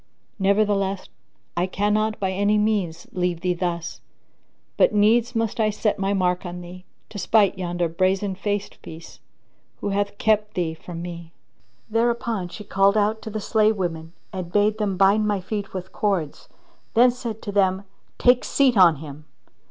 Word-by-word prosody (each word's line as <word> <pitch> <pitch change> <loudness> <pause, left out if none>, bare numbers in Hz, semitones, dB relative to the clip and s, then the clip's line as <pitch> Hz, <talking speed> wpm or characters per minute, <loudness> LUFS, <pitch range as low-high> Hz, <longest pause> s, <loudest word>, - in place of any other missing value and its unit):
Nevertheless, 200 -1 +1 0.5
I 175 +2 0
cannot 210 +3 0
by 190 -1 -1
any 205 +2 +2
means 205 -6 0
leave 180 -2 -1
thee 180 0 +1
thus, 170 -1 -4 0.7
but - - +3
needs 225 +4 +3
must 225 0 -1
I 215 -1 +3
set 210 0 -1
my 195 0 0
mark 180 -2 0
on 180 -1 -6
thee, 180 +1 -11 0.2
to 205 - -7
spite 200 0 +3
yonder 175 -2 -2
brazen 185 +4 0
faced 205 +1 -4
piece, 165 +1 -11 0.6
who - - -3
hath 200 0 -1
kept 215 -1 +1
thee 170 -3 -1
from 165 +1 -8
me." 170 -1 -8 0.5
There 230 +2 +2
upon 230 -5 -2
she 210 - -9
called 200 +1 +2
out 215 +1 +1
to 220 - -7
the 215 0 -4
slave 215 +1 +2
women 165 -3 -4 0.2
and 180 -2 -5
bade 210 +2 +2
them 200 -3 -1
bind 200 +3 +4
my 205 -2 0
feet 200 +2 -5
with 185 0 -6
cords 190 -8 -2
and - - -34 0.4
then 250 - +6
said 235 -3 -6
to 205 - -4
them, 190 -1 +2 0.3
"Take 245 0 +4
seat 270 -3 +2
on 180 -5 +6
him!" 150 0 -10
195 Hz, 170 wpm, -23 LUFS, 180-215 Hz, 0.7 s, then